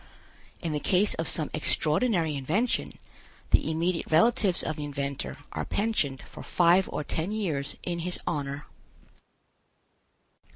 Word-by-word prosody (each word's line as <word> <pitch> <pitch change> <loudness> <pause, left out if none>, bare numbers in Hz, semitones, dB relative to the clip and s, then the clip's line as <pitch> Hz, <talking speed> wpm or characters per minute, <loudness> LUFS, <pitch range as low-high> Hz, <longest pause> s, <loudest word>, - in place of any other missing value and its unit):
In 165 - -1
the 150 - -1
case 195 +6 +3
of 165 - -2
some 155 -3 0
extraordinary 160 +2 +1
invention, 175 - -1 0.5
the - - +4
immediate 165 +2 -1
relatives 200 +2 +3
of 155 - -2
the 150 - -5
inventor 140 -1 -4 0.2
are - - -3
pensioned 175 - -1
for - - -11
five 175 +2 +3
or - - -3
ten 160 +6 -2
years 160 -10 -2
in 175 -1 -3
his 180 +1 +1
honor. 145 -1 -3
165 Hz, 130 wpm, -28 LUFS, 150-185 Hz, 0.5 s, the